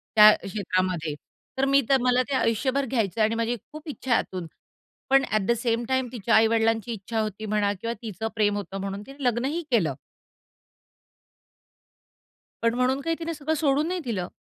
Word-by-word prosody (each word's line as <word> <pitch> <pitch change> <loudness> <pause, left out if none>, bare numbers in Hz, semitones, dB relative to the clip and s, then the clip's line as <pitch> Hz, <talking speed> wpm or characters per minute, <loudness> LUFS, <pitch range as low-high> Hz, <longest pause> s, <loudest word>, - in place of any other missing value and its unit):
त्या 215 0 +10
क्षेत्रामध्ये. 185 -5 -1 0.4
तर 265 - +2
मी 275 +1 +4
तर 270 - +6
मला 250 0 +3
ते 275 - 0
आयुष्यभर 260 +3 +1
घ्यायचं 225 -4 -1
आणि 220 +1 +3
माझी 230 +1 0 0.2
खूप 305 +1 -10
इच्छा 265 -3 -5
आहे 235 - +5
आतून. 180 -3 -5 0.6
पण 270 0 +5
ॲट 215 0 +2
द - - +4
सेम 230 0 0
टाईम 260 -1 +1
तिच्या 235 -2 +1
आई 220 0 +6
वडिलांची 225 0 +1
इच्छा 220 +2 -4
होती 215 0 -3
म्हणा 205 -1 +1
किंवा 230 0 -2
तिचं 220 -1 -4
प्रेम 205 -2 +2
होतं 195 -1 -5
म्हणून 195 +1 -4
तिने 275 +1 -10
लग्नही 255 +7 0
केलं. 175 - +2 2.7
पण 230 0 +3
म्हणून 255 +2 +1
काही 330 +3 -1
तिने 335 0 -3
सगळं 310 0 -2
सोडून 290 0 +1
नाही 365 +1 -2
दिलं. 195 -7 -2
230 Hz, 175 wpm, -25 LUFS, 210-265 Hz, 2.7 s, त्या